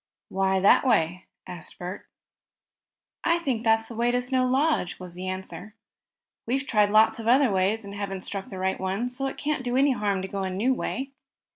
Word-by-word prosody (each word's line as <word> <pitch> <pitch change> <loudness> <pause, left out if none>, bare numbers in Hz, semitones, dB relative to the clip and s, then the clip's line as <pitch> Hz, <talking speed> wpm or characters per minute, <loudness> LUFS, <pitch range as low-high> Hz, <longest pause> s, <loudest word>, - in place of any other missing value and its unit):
"Why, 190 0 +1
that 195 - +5
way?" 180 -8 +1 0.2
asked 175 -3 -8
Bert. 180 +3 -7 1.2
"I 335 0 +3
think 265 -9 -2
that's 225 -1 +3
the 235 - -8
way 235 +2 +1
to 245 +1 +2
Snow 255 0 +1
Lodge," 270 - +1
was 180 -2 -9
the 180 +1 -6
answer. 190 +3 -6 0.7
"We've 270 +4 0
tried 210 -5 +3
lots 215 +2 +4
of 225 - -5
other 255 0 +5
ways, 195 +3 +1
and 200 - -8
haven't 200 -2 -4
struck 195 +1 -5
the 190 - -7
right 190 +1 -1
one, 195 +6 -2
so 270 +2 -2
it - - -6
can't 295 -2 -2
do 245 0 -1
any 280 +1 +4
harm 205 -6 -1
to - - -3
go 195 0 -4
a 190 - -2
new 210 +8 +1
way." 265 +1 -4
215 Hz, 200 wpm, -26 LUFS, 190-255 Hz, 1.2 s, that